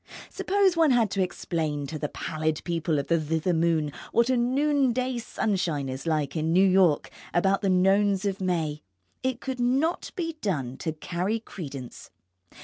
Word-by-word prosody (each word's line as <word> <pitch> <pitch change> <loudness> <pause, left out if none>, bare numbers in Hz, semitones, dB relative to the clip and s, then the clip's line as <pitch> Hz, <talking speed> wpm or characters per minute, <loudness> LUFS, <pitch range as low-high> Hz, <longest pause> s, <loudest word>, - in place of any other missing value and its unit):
Suppose 390 -2 +2
one 325 -2 +4
had 235 -5 +3
to 195 - 0
explain 160 -5 -2
to 155 +2 -5
the 150 - -2
pallid 155 0 -2
people 165 -2 -1
of 140 - -1
the 165 -1 +1
thither 160 +3 0
moon 160 -2 +1 0.2
what 235 +2 +3
a - - +3
noonday 255 -1 +1
sunshine 185 - -1
is 130 +5 -6
like 155 -3 0
in 160 0 0
New 190 +3 +5
York 185 -5 +3 0.2
about 195 +3 +3
the 195 - +1
Nones 195 +2 +3
of 195 -1 -2
May? 160 -5 -1 0.4
It 260 -2 -1
could 260 -2 -4
not 270 +8 +1
be 330 -4 -3
done 140 - -2
to 160 - -3
carry 180 +7 -2
credence. 140 - -8
185 Hz, 165 wpm, -26 LUFS, 155-240 Hz, 0.4 s, New